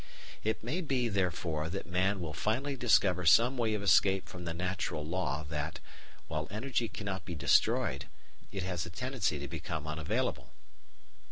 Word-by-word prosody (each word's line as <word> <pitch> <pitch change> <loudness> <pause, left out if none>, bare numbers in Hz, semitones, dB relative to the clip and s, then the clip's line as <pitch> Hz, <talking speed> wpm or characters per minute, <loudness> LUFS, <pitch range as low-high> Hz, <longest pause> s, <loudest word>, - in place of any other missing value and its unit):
It 110 0 -1
may 150 +11 -1
be, 130 -7 0
therefore, 85 -5 -1
that 95 +3 -4
man 95 +3 +1
will 80 -3 -4
finally 130 - 0
discover 100 -8 +3
some 115 +10 +6
way 115 -3 +1
of 100 - -3
escape 95 -1 +4
from 90 -1 -8
the 85 - -2
natural 90 -3 -2
law 80 -3 -1
that, 80 +2 -3 0.5
while 80 -1 -3
energy 115 +2 -1
cannot 95 -3 -4
be 90 -3 -5
destroyed, 70 -2 +3 0.5
it 95 -2 -3
has 90 -2 -2
a 85 - -6
tendency 125 - -1
to 70 0 -5
become 80 -1 -4
unavailable. 80 - -2
90 Hz, 160 wpm, -32 LUFS, 80-110 Hz, 0.5 s, some